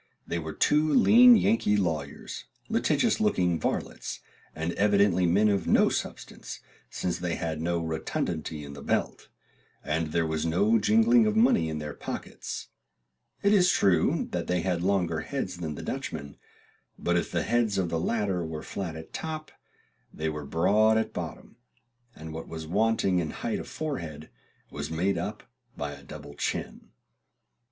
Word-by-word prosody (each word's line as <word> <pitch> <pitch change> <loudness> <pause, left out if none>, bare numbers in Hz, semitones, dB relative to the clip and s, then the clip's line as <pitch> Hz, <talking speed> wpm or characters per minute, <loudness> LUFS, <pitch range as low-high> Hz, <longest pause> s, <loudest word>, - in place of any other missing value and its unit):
They 85 - -2
were 80 -1 -5
two 150 +1 +3
lean 245 +1 +8
Yankee 105 - +2
lawyers, 80 -7 -3 0.2
litigious - - +2
looking 90 -2 +2
varlets, - - -3 0.4
and 80 +2 -2
evidently 100 -3 +3
men 100 +5 +4
of 100 -2 +1
no - - +5
substance, - - -5 0.3
since 90 +6 -2
they 90 -1 -2
had 80 -2 -3
no 85 +1 0
rotundity 80 -1 -3
in 70 -1 -8
the 70 - -9
belt, - - -2 0.5
and 80 +1 -1
there 80 +2 0
was 80 -1 -1
no 100 +8 +3
jingling 225 - +5
of 215 - 0
money 220 - +4
in 80 - -3
their 75 -1 -5
pockets; - - -6 0.7
it 200 +1 +4
is 180 -3 +5
true 95 - +2
they 90 -1 -1
had 90 -1 -1
longer 90 -4 +1
heads 95 -11 -4
than 80 -4 -4
the - - -7
Dutchmen; 70 -2 -5 0.6
but - - 0
if - - 0
the - - 0
heads 115 -3 +1
of 90 -3 0
the 85 -1 -1
latter 100 -1 0
were 80 -1 -5
flat 90 -5 -5
at 80 0 -10
top, 155 -1 -5 0.6
they 80 +1 -2
were 75 -1 -5
broad 105 +8 +3
at 110 - -1
bottom, - - -7 0.6
and 80 0 -8
what 80 +1 -6
was 80 -1 -6
wanting 100 +1 +2
in 80 -3 -2
height - - -3
of - - -7
forehead 80 - -5 0.4
was 75 +1 -5
made 85 +3 0
up 105 +5 -5 0.3
by 75 0 -3
a 70 -1 -10
double 70 +1 -10
chin. - - -4
90 Hz, 160 wpm, -28 LUFS, 80-105 Hz, 0.7 s, lean